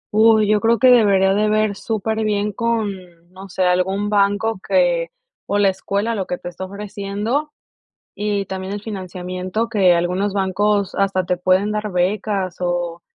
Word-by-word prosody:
Uy. 220 -1 +5
Yo 210 -1 +2
creo 230 +1 +3
que 255 +3 +5
debería 195 -5 +4
de 210 +1 +1
ver 215 -1 +1
superbién 215 -1 -1
con, 230 0 -1 0.5
no 190 +1 -11
sé, 185 - -1
algún 190 +3 +1
banco 205 +1 +1
que - - +2 0.4
o 205 - 0
la 200 -1 +4
escuela, 200 +4 -2
lo 195 -4 -3
que 180 - -3
te 175 - -7
está 190 +2 -7
ofreciendo. 205 +8 -3 0.6
Y 205 -1 -2
también, 190 +1 -5
el 205 0 -6
financiamiento 185 +1 -4
que 190 -6 +3
algunos 180 +4 -1
bancos 200 +1 0
hasta 195 -2 0
te 180 0 -1
pueden 185 +3 +2
dar, 210 -1 -3
becas 190 0 -1
o 175 -1 -2
200 Hz, 160 wpm, -20 LUFS, 185-215 Hz, 0.6 s, Uy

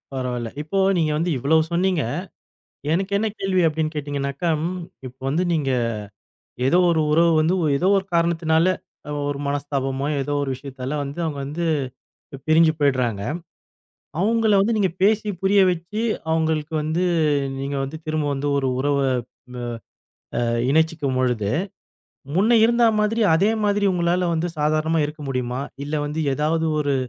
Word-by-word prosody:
பரவால்ல, 125 -3 -3
இப்போ 155 +6 -4 0.2
நீங்க 160 -2 +1
வந்து 165 +3 0
இவ்ளோ 145 +6 +3
சொன்னீங்க? 175 -2 +1 0.9
எனக்கு 190 +4 0
என்ன 220 +2 0
கேள்வி 190 -1 +1
அப்டின் 155 0 -1
கேட்டீங்கனாக்கா 145 +1 -3 0.2
ம், 180 +1 -3 0.3
இப்ப 130 +1 -14
வந்து 160 +6 +1
நீங்க 150 -4 0 1.0
ஏதோ 170 - +4
ஒரு 160 -1 +2
உறவு 165 +2 +4
வந்து 160 +4 +2 0.2
ஏதோ 180 +6 +1
ஒரு 195 - -2
காரணத்தினால, 165 -1 +2 0.4
அ - - -4 0.2
ஒரு 140 -1 -3
மனஸ்தாபமோ, 140 -1 -2 0.2
ஏதோ 145 +2 -2
ஒரு 140 - -3
விஷயத்தால 135 +1 -5
வந்து 140 +4 -6
அவுங்க 150 -3 -3
வந்து 155 +5 -3 0.6
இப்ப 135 - -10
பிரிஞ்சு 160 0 +5
போயிடுறாங்க. 125 -8 +1 1.0
அவுங்கள 220 +1 +2
வந்து 225 +3 +1
நீங்க 195 -3 +2
பேசி, 215 +2 +3
புரிய 195 +1 +4
வச்சு 180 +5 -4 0.3
அவுங்களுக்கு 160 -1 0
வந்து 155 +4 -1 0.6
நீங்க 140 +1 -3
வந்து 135 +4 -5
திரும்ப 155 -1 -1
வந்து 140 +1 -2
ஒரு 135 -1 0
உறவ 145 +1 +1 0.6
வ - - -6 0.8
அ - - +1 0.3
இணைச்சிக்கும் 160 -3 +1
பொழுது, 120 -5 0 0.9
முன்ன 220 +6 +4
இருந்தா 235 +1 +3 0.2
மாதிரி 220 +2 +1
அதே 195 +6 +3 0.2
மாதிரி 205 0 +2
உங்களால 175 +1 +1
வந்து 165 +1 0
சாதாரணமா 155 +2 +1
இருக்க 150 +1 -8
முடியுமா? 125 0 -2 0.2
இல்ல 150 +2 -3
வந்து 150 +2 -3 0.2
ஏதாவது 160 +3 0
ஒரு 145 -1 0
155 Hz, 145 wpm, -22 LUFS, 140-175 Hz, 1.0 s, பிரிஞ்சு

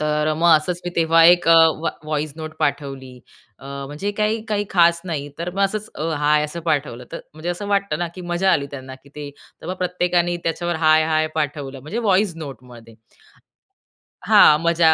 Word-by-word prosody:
तर 150 0 0
मग 170 +2 +3
असंच 175 +3 -3
मी 175 - -3
तेव्हा 165 0 +4
एक 175 0 +5
अ, - - +7 0.3
व्हाई 165 - -2
व्हॉइस 155 -1 -3
नोट 155 -1 -7
पाठवली. 135 -3 -3 0.4
अ, - - -16 0.2
म्हणजे 150 +9 -4
काही 215 +1 0
काही 205 -1 -1
खास 170 -2 +4
नाही. 145 -5 -4
तर 170 +1 -3
मग 200 - 0
असंच 215 +2 -3
अ, - - -6 0.2
हाय 150 0 +2
असं 160 +3 -6
पाठवलं. 135 -4 -2
तर - - -6
म्हणजे 160 +3 -7
असं 175 +4 -5
वाटतं 200 -6 0
ना 175 - -2
की 185 - -9
मजा 190 +2 +2
आली 140 - 0
त्यांना 130 -2 -9
की 140 - -19
ते, 145 -1 -7 0.3
तर - - -9
मग 185 - -3
प्रत्येकानी 175 -1 0
त्याच्यावर 175 +1 -2
हाय, 155 0 +5
हाय 155 0 +1
पाठवलं 145 -3 -3
म्हणजे 155 - -5
व्हॉइस 200 -5 +1
नोटमध्ये. 125 -6 -11 1.3
हां, 150 - +6
मजा 170 -1 +4
160 Hz, 190 wpm, -21 LUFS, 150-175 Hz, 1.3 s, अ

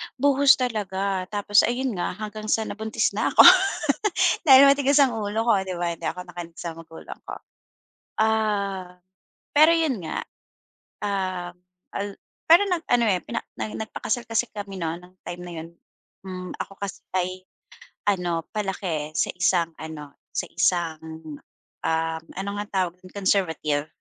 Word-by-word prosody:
buhos 280 +1 +5
talaga, 195 -6 -2
tapos 205 0 +2
ayun 250 +2 +2
nga, 180 - -2
hanggang 215 0 -6
sa 220 +1 +2
nabuntis 220 0 -1
na - - 0
ako, - - +10 1.0
dahil 265 -1 +10
matigas 280 0 +2
ang 260 -5 +4
ulo 210 +2 -1
ko, 230 -4 +3
'di 185 -1 -5
ba, 175 0 -1
hindi - - -5
ako 180 - -3
nakinig 175 -1 -8
sa 170 -1 -4
magulang 165 0 -11
ko. - - -5 0.9
Ah, 200 -4 0 0.6
pero 310 +2 +8
'yon 320 -7 +2
nga, 160 - -3 0.8
ah, 185 -3 -2 0.4
al 200 0 -4 0.3
pero 345 +5 +8
nag-ano, 325 -9 +1
eh, 185 -3 +2
pina 230 - -3 0.2
na 215 - -4
nagpakasal 220 +2 -3
kasi 225 +1 +1
kami 200 -2 -6
no'n 165 +1 -3
nung 180 +1 -18
time 175 0 -6
na 175 - -8
'yon. 160 +1 -6 0.6
Hmm, 185 -1 -6
ako 195 - -6
kasi 200 -2 -5 0.2
ay 185 0 -2 0.7
ano, 175 -4 0
palaki 185 -7 -3
sa - - +1
isang 175 -2 +2
ano, 150 -2 -8 0.2
sa - - 0
isang, 160 -3 -1 0.5
uhm 160 0 -1
ano 195 +2 -3
nga 205 - -3 0.2
tawag 180 +1 -10
dun, 185 0 -15
conservative 160 -7 0
190 Hz, 145 wpm, -24 LUFS, 175-220 Hz, 1.0 s, ako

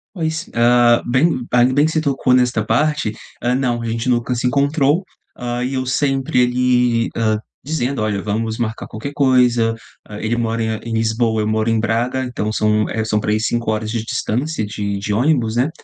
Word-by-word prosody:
Pois. 160 0 -3
Ah, 120 0 +4
bem 130 +1 +1
ainda 125 +1 +4
bem 145 +2 +4
que 160 - 0
você 155 - 0
tocou 135 -3 +1
nesta 125 -4 +2
parte. 145 0 +1 0.3
Ah, 120 +1 +1
não, 125 -2 0
a - - -5
gente 115 +2 -2
nunca 120 0 +1
se 125 +1 0
encontrou. 140 +5 +2 0.3
Ah, 120 0 -3
e 130 +2 -2
eu 130 0 -1
sempre 135 0 0
ele, 125 -1 +2
ah, 110 -2 +1 0.3
dizendo: 140 -4 -2
"Olha, 105 -2 -1
vamos 110 +2 -2
marcar 115 -2 -3
qualquer 125 +7 -7
coisa, 125 -5 +3 0.3
ah, 105 0 -9
ele 110 +2 0
mora 115 -1 -1
em 110 -1 -2
em - - -3
Lisboa, 110 0 +1
eu 105 - -1
moro 110 +1 0
em 115 -1 +2
Braga, 115 +4 0
então 120 -4 -3
são, 105 0 +1
eh, 110 -1 -2
são 105 -1 +1
para 105 - -1
aí 105 - +2
5h 110 -1 -1
de 115 -1 -2
distância 125 +3 -2
de 100 -1 -3
de 105 +1 -3
ônibus, 120 -1 +1
né? 130 +5 +2
120 Hz, 195 wpm, -19 LUFS, 110-130 Hz, 0.3 s, Ah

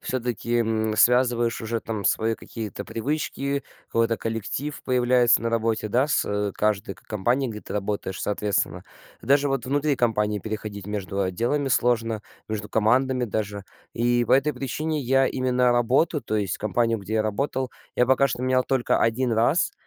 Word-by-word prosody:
всё-таки, 120 -2 -2
м, 110 -1 0
связываешь 120 0 +3
уже 115 +1 -2
там 110 -3 -5
свои 115 +1 +2
какие-то 110 -2 -7
привычки, 140 +2 -2 0.2
какой-то 115 0 +1
коллектив 115 +6 -3
появляется 125 -1 +3
на 115 - -1
работе, 115 -1 0
да, 125 +6 +2
с 105 -8 0
каждой 100 -2 0
ко - - -22
компанией, 120 +5 0
где 105 -1 -8
ты - - -8
работаешь, 100 -2 -3
соответственно. 105 -1 -1 0.4
Даже 140 +3 +3
вот 135 -2 -1
внутри 145 +2 +1
компании 105 -4 +1
переходить 105 -2 -6
между 100 -1 -2
отделами 120 +10 0
сложно, 115 -3 +1 0.3
между 105 -1 -4
командами 125 +4 +2
даже. 105 -2 -3 0.3
И 120 +1 +2
по - - +1
этой 140 +3 +4
причине 150 +3 -3
я 135 +1 +3
именно 125 -1 +2
работу, 130 +6 +2
то 110 - -2
есть 100 -3 -1
компанию, 115 +2 +1
где 100 +2 -5
я 110 - +2
работал, 130 +4 -2 0.3
я 125 - +5
пока 130 +2 +4
что 125 -1 -3
менял 130 0 +2
только 130 -3 +1
1 120 +2 +1
раз. 115 +9 +2
115 Hz, 160 wpm, -25 LUFS, 110-130 Hz, 0.4 s, я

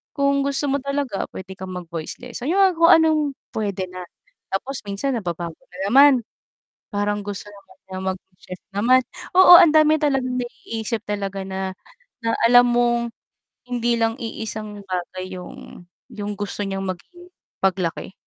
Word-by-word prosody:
kung 280 -1 +2
gusto 280 +1 -1
mo 280 - +2
talaga 280 -6 -2
puwede 190 0 -8
kang 185 0 -7
mag 180 -1 -7
voice 165 -2 -5
lesson." 250 - -6
'Yong 385 +4 +3
ang - - -13
kung 335 +1 +6
anong 320 -1 +4 0.3
puwede 200 -3 -2
na. 185 0 -7 0.5
Tapos 260 +8 -2
minsan 200 +7 -2
nababago 170 -5 -5
na 180 - -12
naman. 280 +4 +8 0.8
Parang 205 0 -1
gusto 205 0 -6
naman 200 -1 -17
niya 185 0 -6
maging 185 0 -10
chef 185 - -9
naman. 245 +6 +4 0.4
Oo, 375 -1 +10
ang 335 - +7
dami 310 0 +6
talagang 270 -4 0
naiisip 230 -2 -5
talaga 195 -1 -3
na 190 0 -3 0.5
na 230 0 +1
alam 245 +1 +7
mong 240 0 +2 0.7
hindi 240 -1 0
lang 225 0 +1
iisang 215 -2 -6
bagay 185 0 -4
'yong 180 -1 -10 0.3
'yong 205 0 -4
gusto 205 0 -4
niyang 195 0 -3
maging 350 - -8 0.3
paglaki. 185 -2 -1
210 Hz, 155 wpm, -22 LUFS, 190-260 Hz, 0.8 s, Oo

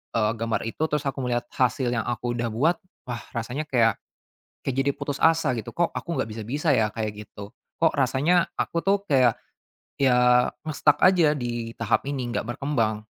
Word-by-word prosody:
eee, 110 -1 +2
gambar 115 0 -1
itu 115 +7 -3
terus 150 -1 -1
aku 140 0 -2
melihat 120 -1 -1
hasil 125 0 +1
yang 115 -3 -1
aku 120 0 -2
udah 120 0 -1
buat, 160 +9 +2 0.3
wah 120 -2 -5
rasanya 125 +7 -3
kayak 115 -5 +2 0.7
kayak 135 -1 -2
jadi 140 +1 +2
putus 145 -1 -4
asa 165 -4 +3
gitu. 115 -4 -6
Kok 175 -1 +1
aku - - -6
nggak 110 - -1
bisa-bisa 140 +8 -1
ya 110 -4 +3
kayak 110 -1 -3 0.2
gitu? 100 +3 -10 0.2
Kok 165 -1 +3
rasanya 145 +6 +2
aku 170 - -1
tuh 200 +2 +1
kayak, 130 - +3 0.7
ya 125 -1 +4 0.2
nge-stuck 150 -1 +2
aja 165 -5 +4
di 120 -2 -4
tahap 115 +4 0
ini, 135 -3 -2
nggak - - 0
berkembang 115 -7 -1
125 Hz, 175 wpm, -25 LUFS, 115-150 Hz, 0.7 s, ya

